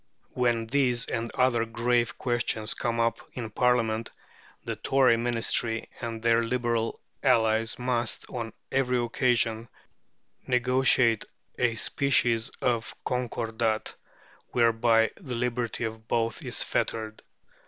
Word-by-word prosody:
When 120 -2 +1
these 125 -1 +1
and 115 0 -3
other 125 -3 +3
grave 120 +1 0
questions 120 -3 0
come 115 -1 -2
up 115 0 +1
in 115 -3 -5
Parliament, 115 -2 +1 0.5
the - - -3
Tory 135 -3 +3
Ministry 115 -1 0
and 115 -2 -5
their 115 0 +4
Liberal 115 -1 -1 0.2
allies 110 0 +2
must, 120 -2 -1
on 115 -2 -5 0.2
every 130 -1 +1
occasion, 120 -2 +1 0.8
negotiate 125 -2 +3 0.3
a 120 -2 +2
species 120 -2 +1
of 120 -2 0
concordat, 115 -3 -1 0.6
whereby 115 -1 +3
the 135 -10 -6
liberty 120 -1 -2
of 110 0 -5
both 115 -1 -1
is - - +1
fettered. 110 -1 -2
115 Hz, 110 wpm, -27 LUFS, 115-125 Hz, 0.8 s, their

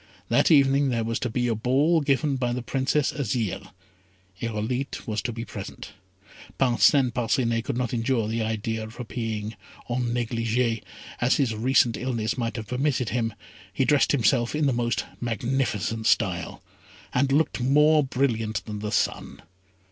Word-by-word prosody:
That - - +3
evening 140 -2 +4
there 115 -2 0
was 115 0 -2
to 125 - -2
be 120 +2 0
a 115 - +1
ball 135 +9 +2
given 140 0 +1
by 125 -2 -1
the 125 0 -3
Princess 135 +3 0
Azire. 120 -6 -2 0.7
Irolite 115 +4 -3
was 105 -2 -2
to 120 - -3
be 115 0 -6
present. - - -8 0.7
Parcin 130 +1 +4
Parcinet 115 -1 0
could - - -2
not 125 -1 -2
endure 115 -1 0
the 115 +1 -1
idea 110 0 -2
of 110 +2 -10
appearing 110 -3 -4 0.4
"en 125 +1 0
négligé," 115 -1 0 0.4
as 120 +1 +3
his 130 -6 +1
recent 120 0 +2
illness 120 -4 -2
might 115 -2 -2
have 110 -2 -5
permitted 125 0 0
him, 115 -3 -1 0.4
he 130 +7 0
dressed 145 -1 +3
himself 120 -1 +2
in 150 0 +1
the 135 - +2
most 120 0 -1
magnificent 115 -2 -1
style, 90 -6 0 0.5
and 135 +2 +2
looked 145 -2 +1
more 150 +4 +4
brilliant 115 -6 -1
than 105 -1 -5
the 105 0 -4
sun. 105 - -1
120 Hz, 155 wpm, -25 LUFS, 115-135 Hz, 0.7 s, evening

